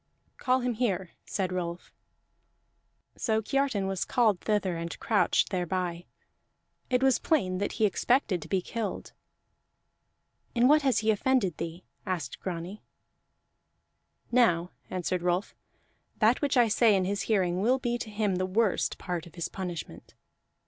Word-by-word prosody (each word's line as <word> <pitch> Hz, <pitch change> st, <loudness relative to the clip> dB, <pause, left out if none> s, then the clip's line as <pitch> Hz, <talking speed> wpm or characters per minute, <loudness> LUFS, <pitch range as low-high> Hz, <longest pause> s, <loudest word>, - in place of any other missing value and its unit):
"Call 255 Hz, 0 st, +1 dB
him 245 Hz, 0 st, 0 dB
here," 195 Hz, -6 st, -1 dB, 0.2 s
said 185 Hz, -2 st, -2 dB
Rolf. 175 Hz, -1 st, -4 dB, 1.2 s
So 220 Hz, -2 st, 0 dB
Kiartan 265 Hz, -3 st, 0 dB
was 190 Hz, -1 st, -1 dB
called 220 Hz, -7 st, +2 dB
thither 205 Hz, -4 st, 0 dB
and 165 Hz, 0 st, -5 dB
crouched 215 Hz, -2 st, +2 dB
thereby; 180 Hz, -1 st, -2 dB, 0.8 s
it 250 Hz, 0 st, +2 dB
was 265 Hz, -2 st, +4 dB
plain 185 Hz, -, +1 dB
that 200 Hz, -, -2 dB
he 220 Hz, -, +2 dB
expected 210 Hz, -, +1 dB
to 155 Hz, -, -9 dB
be 185 Hz, +1 st, 0 dB
killed. 220 Hz, -3 st, -4 dB, 1.4 s
"In 240 Hz, +1 st, +5 dB
what 300 Hz, +2 st, +6 dB
has 270 Hz, -3 st, +2 dB
he 220 Hz, -, +5 dB
offended 215 Hz, -, +1 dB
thee?" 165 Hz, +2 st, -5 dB, 0.2 s
asked 170 Hz, -9 st, -4 dB
Grani. 180 Hz, +3 st, -5 dB, 1.5 s
"Now," 180 Hz, -8 st, +3 dB, 0.2 s
answered 185 Hz, 0 st, -2 dB
Rolf, 180 Hz, +2 st, 0 dB, 0.6 s
"that 225 Hz, +3 st, +3 dB
which 280 Hz, -2 st, +1 dB
I 240 Hz, -1 st, +6 dB
say 220 Hz, 0 st, +4 dB
in 190 Hz, -1 st, +1 dB
his 200 Hz, +1 st, -1 dB
hearing 185 Hz, -4 st, +2 dB
will 250 Hz, +5 st, +3 dB
be 240 Hz, -2 st, -2 dB
to 220 Hz, -, -5 dB
him 205 Hz, -3 st, 0 dB
the 185 Hz, 0 st, -1 dB
worst 205 Hz, +1 st, +1 dB
part 175 Hz, -2 st, -4 dB
of 170 Hz, -, -16 dB
his 170 Hz, -, -3 dB
punishment. 180 Hz, -3 st, -7 dB
195 Hz, 145 wpm, -28 LUFS, 180-235 Hz, 1.5 s, what